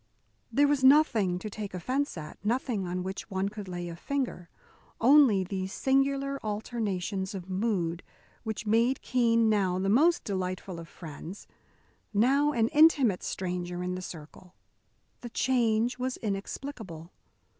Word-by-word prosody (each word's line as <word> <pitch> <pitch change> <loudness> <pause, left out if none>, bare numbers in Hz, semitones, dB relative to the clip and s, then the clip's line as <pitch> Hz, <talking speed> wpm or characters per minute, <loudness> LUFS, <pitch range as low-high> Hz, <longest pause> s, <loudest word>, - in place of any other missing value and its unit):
There 290 +1 +4
was 285 -2 +1
nothing 250 - +5
to 200 - -6
take 205 -2 -6
offence 260 - -2
at, 155 +3 -9
nothing 220 -3 -1
on 180 +1 -3
which 190 +3 -6
one 190 0 -1
could 205 -1 -8
lay 175 -1 -5
a 170 - -6
finger; 245 -5 -3 0.5
only 250 -6 +6
these 190 0 -4
singular 275 +2 +1
alternations 205 -3 -3
of 190 0 -7
mood 185 -4 -1 0.4
which 220 -2 -5
made 230 +5 +2
Keene 230 -2 +3
now 195 -4 +2
the 195 +1 0
most 315 +11 +4
delightful 185 -2 -4
of 165 - -9
friends, 165 +4 -9 0.7
now 275 +7 +4
an 230 -5 +1
intimate 290 - +5
stranger 180 -1 -3
in 180 0 -2
the 185 - -4
circle. 175 +2 -11 0.6
The 240 - -8
change 240 0 +1
was 255 0 -2
inexplicable. 195 - -5
210 Hz, 140 wpm, -29 LUFS, 185-255 Hz, 0.7 s, only